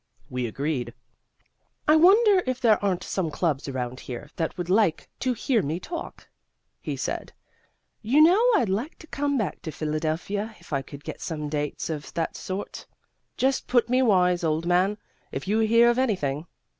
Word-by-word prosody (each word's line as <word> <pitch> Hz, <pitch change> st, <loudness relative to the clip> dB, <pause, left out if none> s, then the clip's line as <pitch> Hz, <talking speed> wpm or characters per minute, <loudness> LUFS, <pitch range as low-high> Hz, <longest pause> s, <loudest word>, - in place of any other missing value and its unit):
We 125 Hz, -1 st, -1 dB
agreed. 125 Hz, -1 st, -3 dB, 0.9 s
"I 305 Hz, -, +6 dB
wonder 390 Hz, +4 st, +6 dB
if 255 Hz, 0 st, -1 dB
there 220 Hz, -5 st, +3 dB
aren't 190 Hz, -3 st, 0 dB
some 185 Hz, -4 st, -2 dB
clubs 150 Hz, -2 st, -1 dB
around 130 Hz, -1 st, -4 dB
here 120 Hz, -2 st, -8 dB
that 165 Hz, -2 st, -2 dB
would 175 Hz, -1 st, -3 dB
like 185 Hz, -3 st, +2 dB
to 255 Hz, -1 st, 0 dB
hear 235 Hz, 0 st, +1 dB
me 155 Hz, +4 st, -2 dB
talk?" 340 Hz, -, -7 dB, 0.5 s
he -, -, -4 dB
said. -, -, -4 dB, 0.7 s
"You 245 Hz, +7 st, +3 dB
know, 355 Hz, +8 st, +6 dB
I'd 340 Hz, -, +2 dB
like 220 Hz, -, -2 dB
to -, -, -13 dB
come 285 Hz, -2 st, -1 dB
back 215 Hz, -6 st, -2 dB
to 160 Hz, -, -5 dB
Philadelphia 160 Hz, +8 st, -2 dB
if -, -, -11 dB
I 140 Hz, -, +1 dB
could 140 Hz, +1 st, -11 dB
get -, -, -7 dB
some 150 Hz, -3 st, -4 dB
dates 150 Hz, -1 st, -3 dB
of 150 Hz, -2 st, -6 dB
that 165 Hz, -1 st, -2 dB
sort. 190 Hz, +2 st, -6 dB, 0.5 s
Just 265 Hz, +1 st, +1 dB
put 240 Hz, -2 st, +2 dB
me 255 Hz, +1 st, +3 dB
wise, 180 Hz, -7 st, +3 dB
old 160 Hz, +1 st, 0 dB
man, 185 Hz, +4 st, +2 dB, 0.3 s
if -, -, -5 dB
you 215 Hz, +3 st, +2 dB
hear 230 Hz, +2 st, +5 dB
of 240 Hz, +1 st, +3 dB
anything. 170 Hz, -, -1 dB
185 Hz, 175 wpm, -26 LUFS, 155-245 Hz, 0.9 s, I